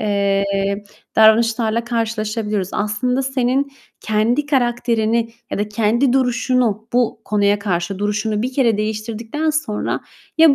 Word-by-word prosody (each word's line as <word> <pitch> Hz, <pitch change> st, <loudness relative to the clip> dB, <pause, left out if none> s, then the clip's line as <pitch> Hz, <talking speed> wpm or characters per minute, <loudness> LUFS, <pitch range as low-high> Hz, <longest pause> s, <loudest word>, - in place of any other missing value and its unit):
eee, 200 Hz, -1 st, 0 dB, 0.3 s
davranışlarla 225 Hz, +1 st, +4 dB
karşılaşabiliyoruz. 215 Hz, -4 st, -2 dB
Aslında 250 Hz, +5 st, 0 dB
senin 265 Hz, +1 st, 0 dB, 0.3 s
kendi 225 Hz, +7 st, +1 dB
karakterini 235 Hz, -4 st, +1 dB, 0.2 s
ya -, -, -2 dB
da 205 Hz, +1 st, -1 dB
kendi 230 Hz, +5 st, +2 dB
duruşunu 245 Hz, -4 st, +1 dB
-bu 240 Hz, -2 st, +1 dB
konuya 205 Hz, -1 st, +2 dB
karşı 190 Hz, -1 st, -2 dB
duruşunu 210 Hz, +1 st, -1 dB
bir 255 Hz, -, -2 dB
kere 245 Hz, -5 st, +2 dB
değiştirdikten 220 Hz, +7 st, -2 dB
sonra 295 Hz, -9 st, -2 dB, 0.4 s
ya 320 Hz, -3 st, +7 dB
220 Hz, 115 wpm, -19 LUFS, 210-245 Hz, 0.4 s, ya